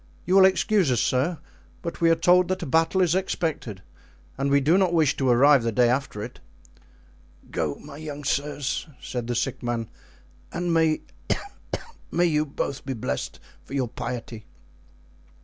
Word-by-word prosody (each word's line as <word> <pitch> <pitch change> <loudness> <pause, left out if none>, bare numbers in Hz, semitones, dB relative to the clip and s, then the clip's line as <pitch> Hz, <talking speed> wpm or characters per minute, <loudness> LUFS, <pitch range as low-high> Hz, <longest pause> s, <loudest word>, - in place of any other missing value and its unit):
You 180 - 0
will 190 0 +8
excuse 190 -4 +3
us, 120 - +2
sir, 140 +9 +1 0.5
but 170 0 -5
we 165 - +5
are 165 - +5
told 180 +1 +4
that 185 0 -2
a - - -3
battle 165 +6 +2
is 170 -2 +2
expected 160 - -2 0.5
and 135 +1 -1
we 140 0 +5
do 150 +5 +3
not 185 -2 +3
wish 155 -4 +3
to 135 -2 +1
arrive 135 +3 +6
the 115 0 -1
day 120 +2 +4
after 125 -5 -2
it." - - -9 1.1
"Go, - - -1
my 140 - -11
young 150 -2 -7
sirs," 140 0 -1
said 120 -2 -5
the 120 - -1
sick - - -1
man, 120 -2 -3 0.6
"and 175 0 -1
may 160 -1 +2 1.2
you 155 -2 +1
both 140 -1 -4
be 135 - -3
blessed 125 +1 -4 0.2
for 135 - -8
your 130 -4 0
piety. 115 -2 -6
145 Hz, 165 wpm, -25 LUFS, 125-165 Hz, 1.2 s, will